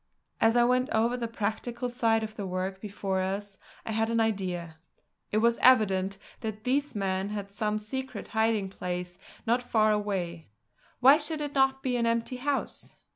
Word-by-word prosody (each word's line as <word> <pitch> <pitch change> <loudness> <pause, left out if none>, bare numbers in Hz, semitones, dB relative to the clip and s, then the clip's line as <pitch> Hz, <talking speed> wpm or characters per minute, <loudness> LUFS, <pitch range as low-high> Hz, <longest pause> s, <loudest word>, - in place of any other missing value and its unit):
As 225 +1 +4
I 240 - +6
went 250 +1 +2
over 230 +2 +2
the 240 -2 -2
practical 230 +2 -3
side 230 -2 +1
of 215 0 -6
the 200 -3 -4
work 185 +1 -3
before 195 -2 -2
us, 195 +1 -3 0.3
I - - -3
had 225 +1 +1
an 230 0 +1
idea. 180 -7 -1 0.5
It 210 - +1
was 235 +1 +3
evident 195 -6 +4 0.2
that 215 -1 -5
these 280 +1 0
men 190 -1 -1
had 205 -1 -5
some 210 +1 -1
secret 260 +5 -5
hiding 220 -2 +1
place 180 -1 -5 0.3
not 240 +2 +2
far 215 -3 +2
away; 185 - -2 0.5
why 275 +4 +8
should 310 0 -3
it 290 -1 -4
not 270 -1 +2
be 250 -2 0
an 235 -1 +1
empty 230 +2 0
house? 275 +2 -3
220 Hz, 175 wpm, -28 LUFS, 195-245 Hz, 0.5 s, why